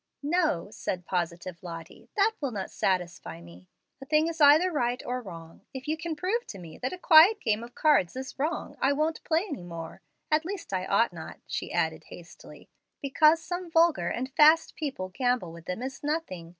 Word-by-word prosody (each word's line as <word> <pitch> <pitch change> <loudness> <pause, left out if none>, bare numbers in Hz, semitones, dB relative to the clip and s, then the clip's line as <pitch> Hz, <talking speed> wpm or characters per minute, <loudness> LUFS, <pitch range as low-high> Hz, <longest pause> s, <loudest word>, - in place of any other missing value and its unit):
"No," 295 - 0
said 180 -4 -4
positive 175 0 -3
Lottie, 165 -2 -10
"that 420 +1 +4
will 280 - -1
not 200 -5 -5
satisfy 175 - -2
me. 85 +2 -15 0.3
A - - -8
thing 305 +1 +3
is 330 -1 -4
either 305 +6 +6
right 245 -5 0
or 250 +1 -2
wrong. 165 -6 -11
If 265 +1 -7
you 310 - +1
can 325 0 -4
prove 390 +10 -2
to 200 - -8
me 170 -4 -11
that 255 - -2
a 365 - -6
quiet 360 +5 +7
game 220 0 0
of 240 +1 -11
cards 290 - +3
is 265 +1 -7
wrong, 310 +5 -2
I 275 +2 +3
won't 310 +3 -1
play 330 +3 +1
any 290 - -6
more 170 -2 -8 0.3
at 305 +1 +3
least 365 - -6
I 185 0 -1
ought 225 +4 +2
not," - - -9
she - - -4
added - - -1
hastily. - - -13 0.3
"Because 310 +3 +3
some 355 +2 -5
vulgar 325 - +3
and 260 +6 -3
fast 315 +2 +5
people 265 -12 -4
gamble 245 -3 -1
with 170 -1 -12
them 185 +7 -4
is 265 +1 -6
nothing. 290 - -3
260 Hz, 195 wpm, -28 LUFS, -, 0.3 s, quiet